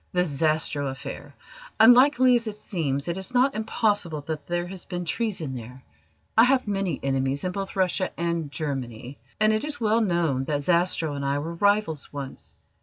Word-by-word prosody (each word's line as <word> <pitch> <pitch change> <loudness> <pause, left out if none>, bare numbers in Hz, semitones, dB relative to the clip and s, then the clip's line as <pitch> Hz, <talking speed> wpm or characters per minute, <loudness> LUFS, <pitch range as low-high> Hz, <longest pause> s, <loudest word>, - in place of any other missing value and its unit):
"The 180 0 +3
Zastrow 155 -2 0
affair. 140 +1 -8 0.4
Unlikely 255 +3 +7
as 235 -1 +1
it 215 - -4
seems, 150 -9 -3
it 170 +2 -2
is 190 +7 -6
not 260 +2 +4
impossible 205 -7 0
that 150 -1 -6
there 175 0 -1
has 185 0 -8
been 175 -1 -4
treason 175 - -2
there. 125 +1 -9 0.5
I 225 - +7
have 255 -2 +2
many 195 -6 -1
enemies 135 0 0
in 185 - -1
both 195 +1 -5
Russia 185 0 +1
and 170 -3 -1
Germany, 135 -4 -5 0.2
and 215 0 +4
it 215 - 0
is 295 -2 -3
well 225 0 +2
known 170 - +1
that 145 -1 -1
Zastrow 170 -2 +1
and 140 -1 -4
I 140 +1 0
were 160 +4 -4
rivals 200 -4 +1
once. 140 -2 -8
170 Hz, 180 wpm, -25 LUFS, 140-210 Hz, 0.5 s, Unlikely